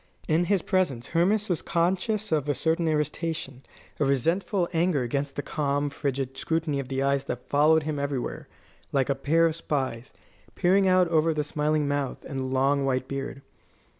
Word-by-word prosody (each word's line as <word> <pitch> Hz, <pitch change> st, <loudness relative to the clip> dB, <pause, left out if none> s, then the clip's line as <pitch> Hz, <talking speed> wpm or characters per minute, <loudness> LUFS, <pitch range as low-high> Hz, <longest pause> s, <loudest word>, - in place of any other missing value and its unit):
In 165 Hz, +3 st, +2 dB
his 195 Hz, -1 st, +1 dB
presence 155 Hz, -11 st, 0 dB
Hermas 200 Hz, +6 st, +2 dB
was 175 Hz, -4 st, -1 dB
conscious 190 Hz, +5 st, 0 dB
of 150 Hz, -2 st, +1 dB
a 145 Hz, -, +1 dB
certain 165 Hz, +3 st, +1 dB
irritation, 150 Hz, -3 st, -2 dB, 0.4 s
a -, -, +3 dB
resentful 170 Hz, -, +1 dB
anger 165 Hz, -5 st, +2 dB
against 140 Hz, +3 st, -2 dB
the 145 Hz, -, -3 dB
calm, 145 Hz, 0 st, -1 dB
frigid 135 Hz, -2 st, -3 dB
scrutiny 160 Hz, -1 st, -1 dB
of 135 Hz, -, -4 dB
the 135 Hz, 0 st, -1 dB
eyes 140 Hz, 0 st, +1 dB
that 125 Hz, 0 st, -5 dB
followed 155 Hz, +2 st, +4 dB
him 150 Hz, -1 st, -3 dB
everywhere, 140 Hz, -3 st, -3 dB, 0.4 s
like 135 Hz, -1 st, +1 dB
a -, -, +4 dB
pair 155 Hz, +5 st, +2 dB
of 160 Hz, -1 st, +1 dB
spies, 130 Hz, -7 st, -3 dB, 0.4 s
peering 190 Hz, +2 st, +3 dB
out 185 Hz, -1 st, +4 dB
over 160 Hz, -1 st, +2 dB
the 150 Hz, -, 0 dB
smiling 150 Hz, 0 st, 0 dB
mouth 145 Hz, -2 st, -2 dB
and 135 Hz, -, -4 dB
the 130 Hz, -, -2 dB
long 135 Hz, +2 st, +1 dB
white 130 Hz, -1 st, 0 dB
beard. 135 Hz, 0 st, -5 dB
150 Hz, 175 wpm, -26 LUFS, 135-165 Hz, 0.4 s, followed